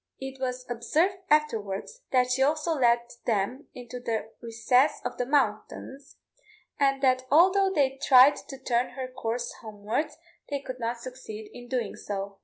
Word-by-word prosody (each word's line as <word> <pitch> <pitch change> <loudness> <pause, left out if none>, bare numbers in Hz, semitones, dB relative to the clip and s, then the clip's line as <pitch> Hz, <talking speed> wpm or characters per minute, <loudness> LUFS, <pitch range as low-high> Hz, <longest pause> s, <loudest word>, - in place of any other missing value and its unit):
It 265 0 -7
was 250 -1 -3
observed 300 - +1
afterwards 300 - 0
that 250 -2 +2
she 260 +1 +1
also 310 +4 +2
led 240 -5 +3 0.3
them 235 +6 -1
into 245 0 -8
the 225 -2 -3
recesses 245 +4 +2
of 245 0 -4
the 245 - -1
mountains, 270 +1 -1 0.6
and 275 -1 +2
that 255 -1 +2
although 380 +6 +5
they 270 -6 +1
tried 270 0 +7
to 270 - -7
turn 245 -1 -1
her 260 0 -4
course 240 -1 -4
homewards, 215 +6 -3 0.3
they 285 -1 -1
could 255 -2 -8
not 235 0 -2
succeed 235 -4 -9
in 245 0 -10
doing 240 -5 -2
so. 200 -1 -5
255 Hz, 155 wpm, -27 LUFS, 235-275 Hz, 0.6 s, tried